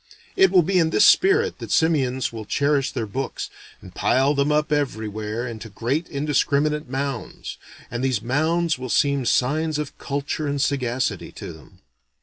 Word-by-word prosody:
It 385 Hz, 0 st, +5 dB
will 180 Hz, -, +5 dB
be 185 Hz, +3 st, +2 dB
in 160 Hz, -2 st, +3 dB
this 205 Hz, -, +4 dB
spirit 410 Hz, +5 st, +4 dB
that -, -, -7 dB
simians 130 Hz, -7 st, +1 dB
will 110 Hz, -2 st, -6 dB
cherish 140 Hz, +4 st, +1 dB
their 115 Hz, -, -3 dB
books, 130 Hz, +6 st, -4 dB, 0.3 s
and -, -, -12 dB
pile 135 Hz, +3 st, +2 dB
them 140 Hz, +1 st, +1 dB
up 150 Hz, 0 st, +1 dB
everywhere 110 Hz, -5 st, -2 dB
into 110 Hz, -1 st, -7 dB
great 130 Hz, -, -2 dB
indiscriminate 150 Hz, 0 st, 0 dB
mounds; 135 Hz, -2 st, -4 dB, 0.3 s
and 120 Hz, +1 st, -3 dB
these 130 Hz, -5 st, +1 dB
mounds 155 Hz, +6 st, 0 dB
will 130 Hz, 0 st, -5 dB
seem 140 Hz, +1 st, +2 dB
signs 155 Hz, +4 st, +1 dB
of 150 Hz, -2 st, -5 dB
culture 140 Hz, +2 st, -3 dB
and 140 Hz, 0 st, -1 dB
sagacity 130 Hz, -3 st, -1 dB
to -, -, -8 dB
them. -, -, -17 dB
140 Hz, 160 wpm, -23 LUFS, 125-150 Hz, 0.3 s, It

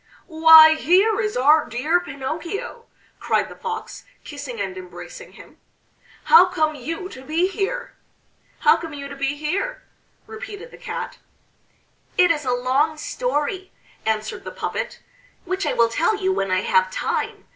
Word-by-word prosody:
"Why 320 Hz, -1 st, +8 dB
here 385 Hz, +7 st, +3 dB
is 420 Hz, -1 st, -2 dB
our 300 Hz, +5 st, +4 dB
dear 300 Hz, +9 st, +1 dB
Pinocchio!" 335 Hz, -, -6 dB, 0.3 s
cried -, -, 0 dB
the -, -, -11 dB
Fox, 450 Hz, -2 st, -6 dB, 0.2 s
kissing 285 Hz, -6 st, -7 dB
and 190 Hz, -2 st, -3 dB
embracing 185 Hz, -, -10 dB
him. -, -, -16 dB, 0.6 s
"How 465 Hz, -6 st, +7 dB
come 315 Hz, -4 st, 0 dB
you 325 Hz, +7 st, -5 dB
to 260 Hz, -, -11 dB
be 320 Hz, +6 st, +1 dB
here?" 425 Hz, +5 st, -4 dB, 0.7 s
"How -, -, +5 dB
come 325 Hz, -3 st, -7 dB
you 280 Hz, -1 st, -7 dB
to 280 Hz, -, -9 dB
be 275 Hz, +1 st, -2 dB
here?" 360 Hz, +12 st, -3 dB, 0.4 s
repeated 445 Hz, 0 st, -9 dB
the -, -, -13 dB
Cat. -, -, -6 dB, 1.0 s
"It 360 Hz, -1 st, +5 dB
is 300 Hz, -3 st, -2 dB
a 250 Hz, -, 0 dB
long 260 Hz, +5 st, +1 dB
story," 375 Hz, -1 st, -3 dB, 0.3 s
answered 215 Hz, -1 st, -2 dB
the -, -, -6 dB
puppet, -, -, -5 dB, 0.4 s
"which 375 Hz, +2 st, -2 dB
I -, -, 0 dB
will 235 Hz, -1 st, +3 dB
tell 330 Hz, -, +1 dB
you 380 Hz, -2 st, 0 dB
when 195 Hz, -, -1 dB
I 185 Hz, 0 st, +1 dB
have 185 Hz, 0 st, +2 dB
time. -, -, -3 dB
315 Hz, 155 wpm, -22 LUFS, 270-380 Hz, 1.0 s, Why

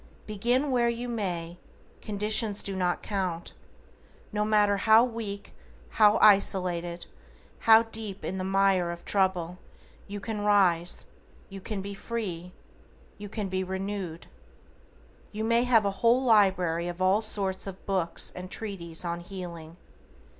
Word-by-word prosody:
Begin 245 Hz, +7 st, 0 dB
where 240 Hz, -2 st, +2 dB
you 235 Hz, +1 st, -4 dB
may, 175 Hz, -7 st, -4 dB, 0.4 s
conditions 210 Hz, 0 st, +1 dB
do 195 Hz, -, -3 dB
not 180 Hz, -1 st, -1 dB
count. 185 Hz, -5 st, -3 dB, 0.8 s
No 210 Hz, 0 st, 0 dB
matter 210 Hz, -1 st, +3 dB
how 220 Hz, +3 st, +5 dB
weak, 225 Hz, -5 st, -5 dB, 0.4 s
how 210 Hz, -1 st, +4 dB
isolated, 180 Hz, -4 st, +3 dB, 0.6 s
how 225 Hz, 0 st, +8 dB
deep 220 Hz, -3 st, -7 dB
in 190 Hz, -, -4 dB
the -, -, -3 dB
mire 195 Hz, -2 st, +2 dB
of 170 Hz, 0 st, -7 dB
trouble, 185 Hz, -3 st, 0 dB, 0.5 s
you 205 Hz, 0 st, -6 dB
can 210 Hz, 0 st, -5 dB
rise, 185 Hz, -5 st, +3 dB, 0.4 s
you 195 Hz, 0 st, -9 dB
can 200 Hz, -1 st, -5 dB
be 200 Hz, 0 st, -6 dB
free, 190 Hz, -5 st, -5 dB, 0.7 s
you 205 Hz, 0 st, -8 dB
can 210 Hz, -1 st, -4 dB
be 190 Hz, 0 st, -2 dB
renewed. 190 Hz, -2 st, -5 dB, 1.1 s
You 215 Hz, +1 st, -4 dB
may 230 Hz, +2 st, +2 dB
have 230 Hz, -4 st, +4 dB
a 200 Hz, -, +1 dB
whole 240 Hz, +3 st, +4 dB
library 190 Hz, -7 st, +3 dB
of 175 Hz, 0 st, -6 dB
all 190 Hz, +3 st, +3 dB
sorts 200 Hz, -3 st, -2 dB
of 195 Hz, -1 st, -9 dB
books 185 Hz, -4 st, 0 dB
and 180 Hz, 0 st, -7 dB
treatises 180 Hz, -6 st, -6 dB
on 170 Hz, 0 st, -3 dB
healing. 175 Hz, -3 st, -9 dB
195 Hz, 140 wpm, -27 LUFS, 180-215 Hz, 1.1 s, how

